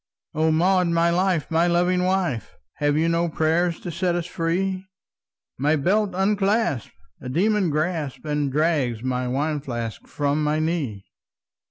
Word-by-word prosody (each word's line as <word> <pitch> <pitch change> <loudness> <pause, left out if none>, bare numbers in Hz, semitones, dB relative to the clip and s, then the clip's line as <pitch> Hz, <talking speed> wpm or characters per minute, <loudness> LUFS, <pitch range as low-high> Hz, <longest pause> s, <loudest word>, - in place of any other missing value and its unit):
"O 160 +1 +2
Maud, 180 +3 +3
my 170 0 +2
life! 180 -3 +1
my 165 +2 +3
loving 180 +1 +2
wife! 180 - -1 0.2
Have 145 0 +1
you 160 +1 +2
no 170 +1 +1
prayer 160 +3 +1
to 170 +1 -7
set 175 +1 0
us 175 -1 -2
free? 185 +2 -2 0.7
My 150 +3 +3
belt 190 +6 +1
unclasps, 200 - +1 0.3
a 125 - -6
demon 195 +5 +2
grasps 155 -2 -2
And 150 -2 -1
drags 140 -6 0
my 125 -1 -1
wine 145 +4 -1
flask 120 -5 -5
from 145 +1 -1
my 150 +1 +1
knee!" 155 - -2
165 Hz, 150 wpm, -23 LUFS, 145-180 Hz, 0.7 s, Maud